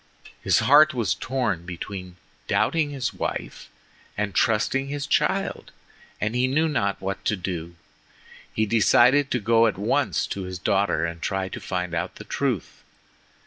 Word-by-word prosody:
His - - +3
heart 145 +3 +6
was 110 -7 +1
torn 120 -10 -2
between 90 +1 -7 0.3
doubting 160 -3 +1
his 135 -5 -3
wife - - -5 0.5
and 105 -1 -2
trusting 125 +5 +1
his 145 0 -3
child, 145 - 0 0.5
and 110 +2 -1
he 125 +1 +2
knew 155 +5 +2
not 100 -10 -1
what 95 +1 -4
to 105 - +2
do. 85 -2 -5 0.8
He 110 - 0
decided 125 +6 +4
to 125 - 0
go 115 +1 +4
at 110 - -2
once 100 - 0
to 100 - -5
his 90 0 -5
daughter 95 -2 +1
and 85 0 -5
try 95 -1 -2
to - - -6
find 90 -2 -3
out 85 -1 -3
the - - -9
truth. - - -3
105 Hz, 155 wpm, -24 LUFS, 90-130 Hz, 0.8 s, heart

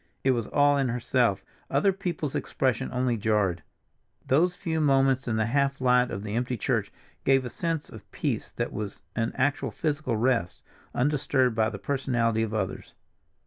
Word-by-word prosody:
It 130 - +4
was 115 -4 -1
all 145 0 +3
in 135 -2 +1
herself—other 125 - 0
people's 170 -6 -3
expression 130 -1 -1
only 125 -2 0
jarred. 105 -5 +1 0.6
Those 175 +7 +3
few 165 -3 -2
moments 135 -2 +3
in 115 - 0
the 110 0 +1
half 140 +3 +1
light 125 -1 +3
of 100 - -5
the 105 -1 -5
empty 125 +1 -1
church - - -1 0.3
gave 135 -1 +3
a 125 - -5
sense 165 -3 -2
of - - -13
peace - - -2
that - - -3
was 105 -1 -5
an 115 0 0
actual 140 +2 +1
physical 150 -7 -1
rest, 115 -6 0 0.3
undisturbed 135 -2 +2
by 110 0 +2
the 100 - -6
personality 115 -1 0
of 110 -1 -1
others. 110 - -3
130 Hz, 165 wpm, -27 LUFS, 115-140 Hz, 0.6 s, It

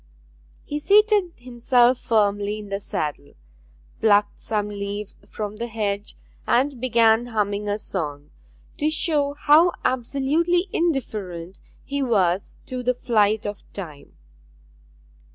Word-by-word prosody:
He 295 - -4
seated 410 0 +4
himself 245 0 +2
firmly 205 -1 +1
in 210 -1 -9
the 195 0 -2
saddle, 150 -7 -4 0.6
plucked 205 -2 +3
some 210 -2 -1
leaves 205 0 -5
from 210 -1 -5
the 235 - -3
hedge, 210 -2 -3 0.3
and 260 0 +1
began 230 -1 +3
humming 205 -2 -1
a 205 - 0
song, 150 -8 -5 0.5
to 305 0 +2
show 300 -3 0
how 310 +4 +5
absolutely 295 +9 +1
indifferent 200 - -2 0.2
he 280 0 -3
was 195 -7 +1
to 255 -1 -5
the 250 0 0
flight 215 -3 +1
of 205 -1 -5
time. 155 -8 -9
225 Hz, 115 wpm, -23 LUFS, 205-275 Hz, 0.6 s, how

